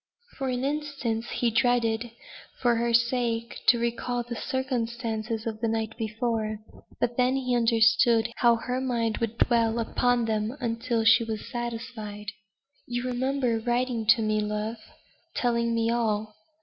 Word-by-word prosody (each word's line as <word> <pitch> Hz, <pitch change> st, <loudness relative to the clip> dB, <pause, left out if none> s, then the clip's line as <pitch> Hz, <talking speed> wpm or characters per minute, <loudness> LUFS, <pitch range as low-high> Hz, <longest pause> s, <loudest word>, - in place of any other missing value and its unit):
For 270 Hz, -1 st, -1 dB
an 250 Hz, 0 st, -1 dB
instant 275 Hz, -6 st, -2 dB
he 240 Hz, -1 st, 0 dB
dreaded, 235 Hz, 0 st, +2 dB, 0.5 s
for 240 Hz, -2 st, +3 dB
her 235 Hz, +1 st, +1 dB
sake, 235 Hz, -1 st, +1 dB
to 240 Hz, -, +7 dB
recall 240 Hz, +1 st, -1 dB
the 235 Hz, 0 st, -6 dB
circumstances 230 Hz, -3 st, -2 dB
of 220 Hz, -1 st, -4 dB
the 230 Hz, -, +1 dB
night 225 Hz, 0 st, -2 dB
before; 220 Hz, -1 st, -2 dB, 0.4 s
but 240 Hz, 0 st, 0 dB
then 250 Hz, +1 st, +3 dB
he 255 Hz, -2 st, 0 dB
understood 230 Hz, 0 st, +4 dB
how 235 Hz, -1 st, +5 dB
her 250 Hz, +2 st, -3 dB
mind 235 Hz, -4 st, -1 dB
would 230 Hz, 0 st, -2 dB
dwell 230 Hz, -2 st, +2 dB
upon 240 Hz, +1 st, +1 dB
them 220 Hz, +3 st, -1 dB
until 230 Hz, -1 st, -1 dB
she 225 Hz, +1 st, +6 dB
was 220 Hz, -2 st, -5 dB
satisfied. 230 Hz, -4 st, -5 dB, 0.6 s
"You 245 Hz, 0 st, -2 dB
remember 255 Hz, -1 st, 0 dB
writing 240 Hz, -1 st, -1 dB
to 225 Hz, 0 st, +5 dB
me, 215 Hz, 0 st, +1 dB
love, 210 Hz, +2 st, -2 dB, 0.6 s
telling 235 Hz, -1 st, +1 dB
me 230 Hz, 0 st, +1 dB
all. 215 Hz, -2 st, 0 dB
235 Hz, 145 wpm, -27 LUFS, 225-245 Hz, 0.6 s, to